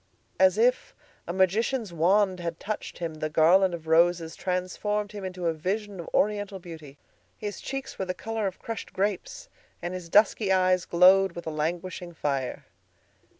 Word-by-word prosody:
As 190 +1 +5
if 245 +3 +2 0.3
a - - -2
magician's 200 +4 +1
wand 185 +3 +3
had 170 -1 -4
touched 215 +1 -5
him, 165 -2 -4
the 155 0 -4
garland 175 +4 +4
of 165 -2 -11
roses 165 0 +3
transformed 205 +3 -2
him 205 -2 -7
into 185 -1 -5
a 165 - +2
vision 195 +5 -3
of 170 - -7
Oriental 205 -1 0
beauty. 160 -6 -11 0.4
His 205 -1 -6
cheeks 270 0 -6
were 190 - -1
the 185 0 -3
color 225 -2 -3
of 190 - -5
crushed 225 -3 -7
grapes, 205 - -2 0.3
and 175 - -4
his 180 -2 -7
dusky 210 +1 +4
eyes 185 -1 +3
glowed 185 +1 +5
with 170 0 -8
a 160 - -3
languishing 175 +3 -4
fire. 135 -4 -2
185 Hz, 165 wpm, -27 LUFS, 170-205 Hz, 0.4 s, As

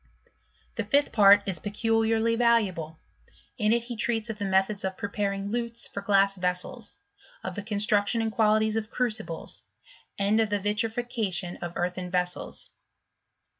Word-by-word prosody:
The - - 0
fifth 280 +8 +2
part 205 -1 +7
is 185 -4 -2
peculiarly 225 +2 +1
valuable; 205 -10 +1 0.6
in 210 -1 +2
it 235 0 +2
he 240 0 -6
treats 230 0 -1
of 210 - -9
the 200 - -2
methods 195 +1 +1
of 190 0 -3
preparing 200 -1 -2
lutes 235 +1 -2
for 200 - -6
glass 195 0 +3
vessels, 180 0 -2 0.5
of - - -4
the 205 - -4
construction 205 +1 +1
and 225 -1 0
qualities 215 0 +2
of 220 0 -2
crucibles, 220 -10 -3 0.5
and 200 +2 +2
of 220 -2 +2
the 205 0 0
vitrification 210 -3 -1
of 175 -1 -6
earthen 180 +1 -2
vessels. 180 0 -2
210 Hz, 145 wpm, -27 LUFS, 195-225 Hz, 0.6 s, part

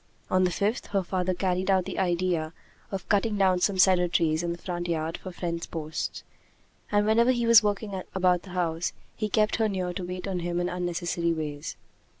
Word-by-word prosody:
On 185 0 +4
the - - +2
fifth, 205 +6 -1
her 195 -2 0
father 185 0 -1
carried 185 0 0
out 190 -2 +3
the - - -4
idea 175 -3 0 0.4
of 195 -2 -5
cutting 210 +1 +2
down 190 -2 +3
some 190 +1 +1
cedar 185 -1 +5
trees 160 -2 +1
in 170 0 -2
the 170 - -4
front 175 0 -4
yard 160 -1 -1
for 185 - -7
fence 170 -1 -4
posts; 160 -1 -4 0.7
and 205 0 +3
whenever 230 +3 +4
he 240 -2 0
was 230 -1 +8
working 205 -2 -2
about 180 -2 +3
the 190 - -13
house, 170 -1 -1 0.2
he 215 -1 -2
kept 215 0 +2
her 220 -1 +2
near 185 -2 -2
to 185 - -4
wait 180 +1 -5
on 190 -2 -2
him 175 0 -2
in 175 0 0
unnecessary 175 -1 -1
ways. 150 -2 -5
180 Hz, 200 wpm, -27 LUFS, 175-195 Hz, 0.7 s, was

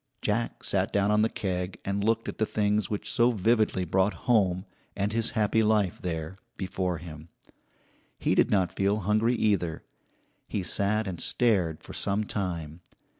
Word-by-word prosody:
Jack 115 +3 -1
sat 100 +3 0
down 100 0 +2
on 105 0 +4
the 110 - +3
keg 90 -3 -3
and 100 +1 -1
looked 115 +1 +1
at - - -6
the 110 - +3
things 105 -1 0
which 105 - -3
so 120 +1 +4
vividly 110 -3 +2
brought 95 +4 +1
home, 95 -6 +2 0.3
and 100 +2 -1
his 115 0 +1
happy 110 +1 +3
life 105 -4 +1
there, 85 +1 -4 0.2
before 95 -2 -2
him. 80 -1 -10 0.9
He - - +1
did - - +3
not 95 -3 +1
feel 100 +2 +1
hungry, 110 +5 +2
either. 95 -8 0 0.6
He 100 - -2
sat 105 +4 0
and 95 -4 -4
stared 95 -10 +1
for - - -9
some 100 +2 0
time. 85 -6 -4
100 Hz, 165 wpm, -28 LUFS, 90-110 Hz, 0.9 s, on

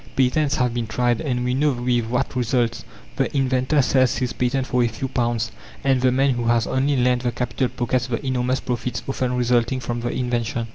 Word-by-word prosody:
Patents 140 +3 +2
have 125 -2 +1
been 120 -2 -2
tried, 120 +1 0
and 125 -4 -1
we 125 - 0
know 145 +2 +2
with 120 -1 0
what 125 +2 -1
results. 120 -1 0 0.3
The 135 - 0
inventor 130 +2 +2
sells 130 0 +2
his 125 -1 -2
patent 130 +1 0
for 125 -2 +1
a - - +3
few 115 +4 -4
pounds, 120 -3 -1 0.3
and 135 -2 +2
the 130 0 +4
man 135 +2 +3
who 120 -2 -2
has 115 -1 +2
only 135 +2 +1
lent 125 0 +2
the 120 -1 0
capital 125 +2 -1
pockets 125 +1 -1
the 125 +3 -3
enormous 130 0 0
profits 125 0 -3
often 130 -2 -1
resulting 125 0 +1
from 120 -1 -3
the 120 +1 -2
invention. 120 -2 -2
125 Hz, 205 wpm, -22 LUFS, 120-130 Hz, 0.3 s, the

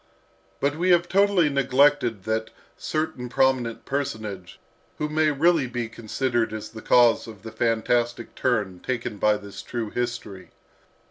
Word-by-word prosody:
But 145 +2 0
we 180 +2 +1
have 175 -1 +4
totally 195 -3 +3
neglected 135 -5 +2
that 110 +1 -2 0.3
certain 155 -6 -3
prominent 130 -3 +1
personage 110 -10 -4 0.4
who 150 - -1
may 155 0 +2
really 150 0 +3
be 120 -1 -3
considered 115 0 -1
as 110 0 -6
the 110 0 -10
cause 120 -1 +4
of 110 -3 -11
the 110 - -7
fantastic 120 +1 0
turn 105 -8 -1
taken 120 -2 -4
by 105 +1 +3
this 100 -1 -9
true 115 -3 -5
history. 105 -7 -4
120 Hz, 140 wpm, -24 LUFS, 110-140 Hz, 0.4 s, have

